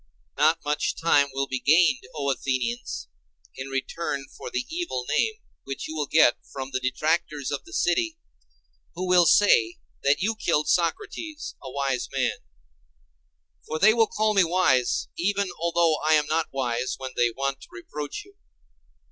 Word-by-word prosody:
NOT 155 +3 +4
much 150 0 0
time 145 -4 +4
will 135 +1 -1
be 130 -1 -3
gained, 155 -2 +3
O 140 -2 0
Athenians, 120 - -3 0.5
in 130 +1 -6
return 135 +1 -3
for - - -7
the - - -2
evil 325 - -3
name 445 - +2 0.3
which 135 0 -5
you 155 - -6
will 150 -2 -2
get 155 -6 +5
from 135 -1 -6
the 130 - -1
detractors 150 +2 -1
of 145 - -4
the - - -14
city, 320 - 0 0.8
who 185 +2 -3
will 180 -2 +5
say 115 - +4 0.2
that 140 +1 +3
you 220 +2 0
killed 165 -7 0
Socrates, 315 - -1
a 130 - -8
wise 135 -2 -1
man; - - -1 1.3
for 155 - -2
they 215 +6 +6
will 225 -1 +3
call 215 0 +1
me 195 -2 +5
wise 165 -8 +2
even 200 +2 0
although 170 -1 +2
I 155 +1 +4
am 150 -1 +4
not 160 +2 0
wise 125 -2 -1
when 130 -1 -6
they 120 0 +3
want 135 +3 -3
to - - -12
reproach 145 - -7
you. 400 0 -21
150 Hz, 165 wpm, -25 LUFS, 135-180 Hz, 1.3 s, they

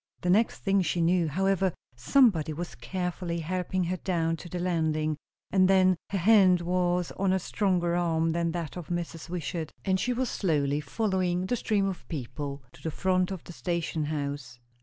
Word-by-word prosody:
The 180 - +1
next 220 +5 +2
thing 195 0 +3
she 175 -1 -1
knew, 170 0 +3
however, 190 +2 +1 0.2
somebody 160 - +3
was 175 +3 -5
carefully 180 -2 -3
helping 185 +2 -1
her 180 +2 -1
down 165 -3 0
to 175 - -10
the 180 - -4
landing; 160 -3 0 0.4
and 185 -1 +5
then, 185 -1 +5
her 200 - -1
hand 190 -2 +5
was 180 0 0
on 195 -1 +2
a 190 - +3
stronger 180 -3 0
arm 165 -2 +1
than 170 0 0
that 170 -4 -4
of 175 -3 -7
Mrs. 170 -2 -4
Wishart, 165 -2 -4
and 190 -1 +2
she 250 - 0
was 250 +1 0
slowly 150 -8 0
following 185 +1 0
the 245 - 0
stream 210 -4 +1
of 190 -3 -4
people 140 -1 -5
to - - -16
the 160 - -2
front 185 +2 +1
of 190 -3 -6
the 175 - -10
station 170 -3 -2
house. 140 -4 -4
175 Hz, 180 wpm, -28 LUFS, 160-185 Hz, 0.4 s, and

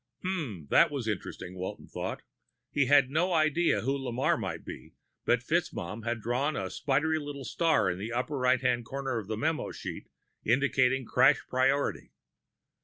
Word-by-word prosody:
_ - - 0
Hmm, 135 - -3
that - - +6
was 135 -6 -4
interesting, 95 -3 -4
Walton 95 0 -6
thought. - - -5 0.5
He 140 -3 +2
had 140 -1 +5
no 175 +5 +1
idea 160 +1 +3
who 135 +4 0
Lamarre 130 -2 0
might - - -5
be, - - -9 0.3
but - - +2
FitzMaugham 110 +2 -2
had 120 -1 -2
drawn 130 +7 0
a 95 -1 -3
spidery 150 +3 +1
little 145 -2 -6
star 160 - +2
in 90 - -5
the 110 +4 -4
upper 130 +4 -2
right 125 0 +3
hand 125 -2 +1
corner 135 -1 -3
of 105 - -8
the 110 0 -3
memo 155 +6 -1
sheet, - - -7 0.4
indicating 130 +1 +2
crash 140 +5 +4
priority. 135 +2 0
130 Hz, 170 wpm, -29 LUFS, 115-145 Hz, 0.5 s, that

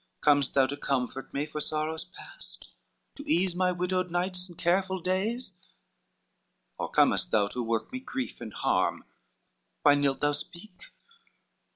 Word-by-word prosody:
Com'st 145 -2 +4
thou 135 -1 +6
to 140 +2 -3
comfort 135 -1 -2
me 140 +2 -1
for 150 0 -5
sorrows 155 +2 -1
past? - - -10 0.5
To 290 +1 -8
ease 180 +1 +3
my 180 0 +3
widow 180 +1 0
nights 180 +1 -1
and 175 - -13
careful 190 +2 +2
days? 195 +6 -1 1.3
Or - - -2
comest - - +3
thou 105 -2 +3
to 125 - -3
work 115 -1 -1
me 255 - -2
grief 260 - -5
and 110 -2 -6
harm? - - +1 0.8
Why 145 - +8
nilt 145 -1 +2
thou 145 0 +3
speak? 180 +6 -6
170 Hz, 150 wpm, -29 LUFS, 140-185 Hz, 1.3 s, Why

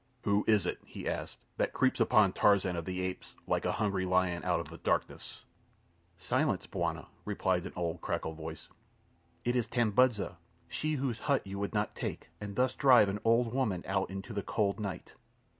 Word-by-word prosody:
"Who 100 0 +2
is 105 -2 +4
it," - - -2
he - - -8
asked, - - -3 0.2
"that - - 0
creeps 130 - +2
upon 105 -5 +5
Tarzan 100 -3 +3
of 85 -1 -3
the 95 0 -3
Apes, 95 0 -5
like - - 0
a - - +1
hungry 100 -3 0
lion 90 -1 +1
out 90 -2 +1
of 80 -3 -6
the 85 - -10
darkness?" - - -2 0.7
"Silence, 95 - 0
bwana!" - - -2 0.2
replied 95 -3 0
an - - -10
old 85 -1 -2
cracked - - -2
voice. 80 0 -6 0.8
"It 120 +1 +1
is 120 -2 +1
Tambudza—she 120 - 0
whose 130 -5 -1
hut 140 +2 +1
you 100 0 -5
would 100 +2 -3
not 105 0 0
take, - - -5
and 100 -1 -5
thus 125 +1 +2
drive 125 -8 +6
an 100 +2 -2
old 115 +1 +3
woman 110 -10 0
out 95 0 0
into 95 +4 -6
the 100 - -1
cold 100 +1 0
night." 100 -4 -5
100 Hz, 180 wpm, -32 LUFS, 90-115 Hz, 0.8 s, drive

